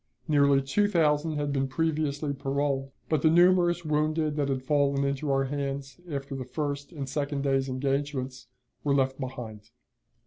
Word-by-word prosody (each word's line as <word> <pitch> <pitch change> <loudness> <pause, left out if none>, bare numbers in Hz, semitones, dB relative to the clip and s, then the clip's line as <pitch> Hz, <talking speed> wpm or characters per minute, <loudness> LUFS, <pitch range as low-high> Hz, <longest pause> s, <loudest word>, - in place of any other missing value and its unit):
Nearly 140 -3 +4
two 205 +10 +2
thousand 155 -4 +2
had 145 -1 -1
been 135 -1 0
previously 150 0 -1
paroled; 135 0 -1 0.2
but 155 -3 +1
the 160 - +5
numerous 175 0 +4
wounded 155 0 +1
that 145 -2 0
had 130 -1 -1
fallen 140 -1 +2
into 140 +1 -1
our 135 0 +2
hands 140 +2 -4
after 140 -2 -4
the 130 - -4
first 145 +3 -4
and 140 -5 -5
second 140 0 -2
day's 135 -1 +1
engagements 135 -1 -2 0.4
were 140 -1 +2
left 135 0 +1
behind. 115 -5 -7
140 Hz, 160 wpm, -28 LUFS, 135-150 Hz, 0.4 s, the